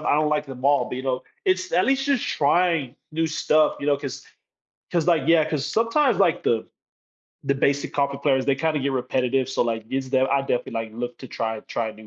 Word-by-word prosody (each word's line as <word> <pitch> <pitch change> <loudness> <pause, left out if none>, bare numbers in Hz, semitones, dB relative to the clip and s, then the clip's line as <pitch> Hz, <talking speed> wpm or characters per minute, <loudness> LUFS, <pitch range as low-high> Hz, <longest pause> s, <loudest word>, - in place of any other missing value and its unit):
I - - +1
don't 155 0 +2
like 150 0 0
them 130 -1 -9
all, 140 0 +3
but, - - -5
you 130 - -5
know, 130 -1 -1 0.2
it's 370 -1 0
at - - +3
least 270 0 +1
just 280 -4 +1
trying 155 -3 +1 0.2
new 165 +1 0
stuff, 155 0 +2
you 140 - -4
know, 145 -1 +3
'cause 140 -2 -7 0.7
'cause, 170 -3 0
like, 170 -3 +3
yeah, 165 -2 +4
'cause 145 -3 -2
sometimes, 230 - +2
like, 185 -5 +2
the 115 -2 0 0.8
the 140 - +1
basic 140 +1 0
coffee 140 -1 0
flavors, 135 -3 +2
they 140 - +2
kinda 155 +2 0
get 140 0 -1
repetitive, 130 0 0
so 130 - +1
like, 115 -2 -2
is 130 -1 -2
there 130 0 +2
I 140 0 +3
definitely 125 -3 -2
like 115 -1 -3
look 120 +2 -5
to 130 - -9
try 110 -1 -3
try 115 -1 -3
new 110 0 -15
140 Hz, 225 wpm, -24 LUFS, 130-160 Hz, 0.8 s, yeah